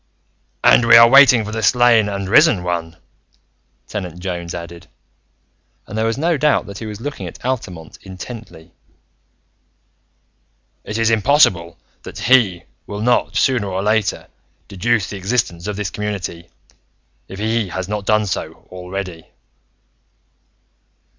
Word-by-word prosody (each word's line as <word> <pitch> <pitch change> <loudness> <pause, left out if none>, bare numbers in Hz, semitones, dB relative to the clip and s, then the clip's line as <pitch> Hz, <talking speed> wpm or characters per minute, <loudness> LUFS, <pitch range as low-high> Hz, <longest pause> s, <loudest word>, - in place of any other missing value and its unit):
"And 120 - +5
we 115 0 +8
are 115 0 +9
waiting 130 -3 +6
for 105 - -6
the 110 +1 -3
Slain 115 -1 +4
and 100 -1 -4
Risen 105 - +4
One," 85 -2 -4 0.9
Tenant 90 -5 -6
Jones 85 -2 -5
added, 85 0 -9 1.0
and 105 - -9
there 110 +1 0
was 115 - -2
no 165 +2 0
doubt 150 +1 +1
that 100 -1 -9
he 110 - -7
was 105 -1 -7
looking 120 -8 -6
at 85 - -12
Altamont 90 -11 -5
intently. 95 -3 -11 2.1
"It 105 - -5
is 115 0 +2
impossible 100 - +2 0.2
that - - -10
He 110 -9 +2 0.2
will 105 0 -6
not, 120 +2 +1
sooner 125 -6 +1
or 95 0 -3
later, 105 -2 0 0.4
deduce 110 +2 -1
the 100 - -7
existence 95 -3 -2
of 105 - -3
this 100 -2 -4
community, 100 -5 -5 0.8
if 95 - -10
He 110 +1 -1
has 95 0 -5
not 105 -1 -5
done 110 0 +2
so 95 - -6
already." 90 -2 -7
105 Hz, 135 wpm, -18 LUFS, 90-115 Hz, 2.1 s, are